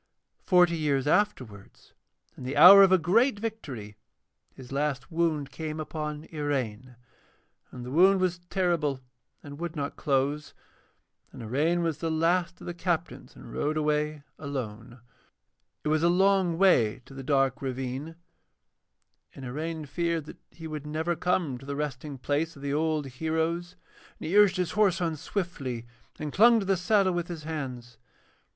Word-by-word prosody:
Forty 180 -2 +5
years 145 -4 0
afterwards, 130 - -2 0.4
in - - -13
the 135 +3 -4
hour 190 +6 +11
of 195 -1 +6
a 185 - +7
great 210 - +2
victory, 145 - -6 0.6
his 130 -1 -12
last 140 -2 -2
wound 160 -4 0
came 155 +2 -5
upon 150 -1 -5
Iraine, 130 -5 -3 0.7
and 125 -1 -9
the 125 - -7
wound 190 +6 +5
was 180 -1 0
terrible 170 -8 0 0.4
and 145 0 -10
would 170 -1 -5
not 145 -2 -4
close. 140 +2 -1 0.8
And 120 - -10
Iraine 155 +10 +1
was 160 -2 -2
the 165 - -2
last 170 +2 +1
of - - -11
the 175 - -4
captains, 175 -1 -3
and - - -12
rode 150 +1 -1
away 150 -1 -1 0.2
alone. 120 -4 -6 0.8
It 150 - -1
was 155 0 +2
a 170 - +4
long 190 -1 +3
way 125 - +3
to 135 - -14
the 135 - -7
dark 135 0 +1
ravine, 135 +4 -4 1.2
and 135 - -9
Iraine 155 +5 -4
feared 165 +1 -2
that - - -12
he 165 - -12
would 150 -2 -6
never 160 +3 -1
come 165 -8 -1
to 135 - -13
the 140 - -3
resting 145 -1 -4
place 145 +5 -2
of 140 - -13
the 140 0 -2
old 155 -1 0
heroes, 160 +5 -2 0.4
and - - -7
he 175 - -1
urged 205 -3 +6
his 180 -2 -1
horse 200 -4 +2
on 165 -3 -1
swiftly, 140 - -4 0.3
and 150 -2 -5
clung 230 +3 +6
to 200 - -3
the 195 0 +2
saddle 185 +1 +2
with 175 -1 -2
his 165 -3 -7
hands. 125 -7 -6
155 Hz, 160 wpm, -27 LUFS, 135-175 Hz, 1.2 s, hour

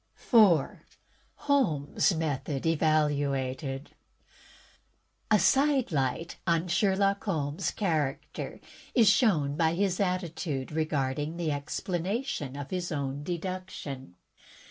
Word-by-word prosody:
4, 200 - +4 0.6
Holmes^ 185 - +2
Method 145 -2 -2
Evaluated 145 -3 0 1.4
A 215 - +6
side 270 +1 +3
light 140 +3 -1
on 170 +1 +2
Sherlock 195 +2 +1
Holmes' 155 -2 -1
character 155 -9 -2 0.4
is 230 -4 +5
shown 155 - +3
by 160 +1 +2
his 190 -1 0
attitude 170 -7 -2
regarding 150 0 -1
the 165 -3 -1
explanation 170 - -3
of 145 -1 -7
his 180 -2 -2
own 140 -2 -3
deduction. 170 - -5
160 Hz, 95 wpm, -29 LUFS, 145-190 Hz, 1.4 s, A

